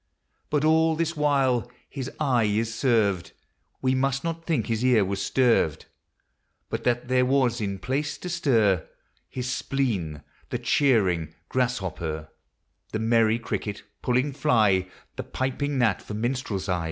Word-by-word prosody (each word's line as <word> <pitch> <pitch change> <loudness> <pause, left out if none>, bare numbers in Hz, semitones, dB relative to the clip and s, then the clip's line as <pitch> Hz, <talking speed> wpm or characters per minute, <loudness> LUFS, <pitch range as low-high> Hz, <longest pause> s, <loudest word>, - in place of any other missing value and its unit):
But 150 0 +1
all 160 +1 +4
this 165 +1 -1
while 135 -5 +1 0.2
his 135 -2 -5
eye 130 -7 +2
is 110 +2 0
served, 110 -7 +1 0.5
We 130 0 +3
must 135 +1 0
not 165 0 -4
think 150 - 0
his 115 +1 -1
ear 120 -6 +4
was 100 +1 -2
sterved; 120 - +2 0.9
But - - -3
that 120 0 +1
there 130 0 +3
was 125 -3 +2
in 100 -2 -2
place 135 +9 -2
to 180 - -6
stir 115 - +2 0.4
His 125 -1 -4
spleen, 100 - -2 0.3
the - - -1
chirring 95 - +2
grasshopper, 95 -11 -2 0.6
The - - -1
merry 115 0 +3
cricket, 105 -3 -4 0.2
puling 130 +3 +1
fly, 105 -8 +3 0.3
The - - -3
piping 135 +2 -2
gnat 115 -7 +2
for 105 - -7
minstrelsy. 105 -6 -1
120 Hz, 140 wpm, -26 LUFS, 105-135 Hz, 0.9 s, all